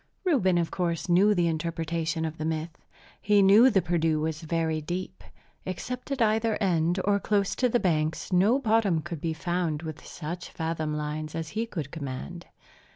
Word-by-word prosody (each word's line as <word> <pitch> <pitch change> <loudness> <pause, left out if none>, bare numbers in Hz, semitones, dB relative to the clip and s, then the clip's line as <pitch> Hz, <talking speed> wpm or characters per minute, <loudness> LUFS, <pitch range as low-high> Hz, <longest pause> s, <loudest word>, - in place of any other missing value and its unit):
Reuben, 225 - +3
of 170 -1 0
course, 170 -3 -2
knew 195 +4 +4
the 175 -2 +2
interpretation 165 0 -2
of 160 0 -5
the - - -2
myth. 160 +1 -3 0.5
He 205 -1 +4
knew 210 +7 +7
the 195 -7 +2
Perdu 165 -2 +1
was 155 0 -2
very 160 -1 -1
deep. 180 +4 -5 0.4
Except 250 +9 -5
at 270 -4 +1
either 220 0 +1
end, 175 -2 +1
or 200 0 +3
close 200 -1 +1
to 250 - +2
the 240 - +2
banks, 160 -1 0
no 200 +8 +4
bottom 215 - +2
could 165 -2 -6
be 165 -1 -1
found 170 -2 -2
with 155 -2 -7
such 175 +3 -6
fathom 160 -2 -3
lines 150 +1 -4
as 165 -2 -4
he 225 +4 -2
could 155 - -5
command. 160 +4 -6
170 Hz, 175 wpm, -27 LUFS, 160-200 Hz, 0.5 s, knew